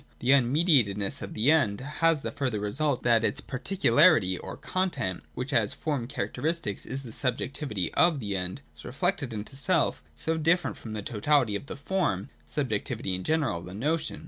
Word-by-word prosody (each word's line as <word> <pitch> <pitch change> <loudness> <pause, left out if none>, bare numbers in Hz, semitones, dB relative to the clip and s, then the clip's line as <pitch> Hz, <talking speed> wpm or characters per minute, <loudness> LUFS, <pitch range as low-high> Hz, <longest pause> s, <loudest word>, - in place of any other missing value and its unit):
The 130 +3 +3
un 130 -3 +4
mediatedness 125 - +2
of 100 - -6
the 120 +8 +3
End 105 -11 +3
has 150 +3 +1
the - - -3
further 130 -7 -2
result 130 +7 0
that 115 -2 +4
its 140 - 0
particularity 140 - +3
or - - -7
con 185 0 -1
tent 95 - -3
— - - -34
which 130 +4 -4
as 115 -5 +2
form 145 -7 -2
characteristic 125 +1 -2
is 135 +3 -4
the 120 - -9
subjectivity 125 - -2
of 170 -5 +4
the 100 -5 -3
End 90 -6 -3
— 75 - -34
is 75 - -13
reflected 160 -1 -1
into 110 +4 -6
self, 145 - +1
and 75 - -24
so 160 0 0
different 165 +3 +2
from 110 - -8
the 105 -2 -4
totality 120 0 +2
of 120 - -5
the - - -6
form, 145 - -1
subjectivity 95 - -2
in 90 0 -3
general, 145 - 0
the 90 +2 -9
notion. 155 +8 -1
130 Hz, 195 wpm, -28 LUFS, 105-155 Hz, -, un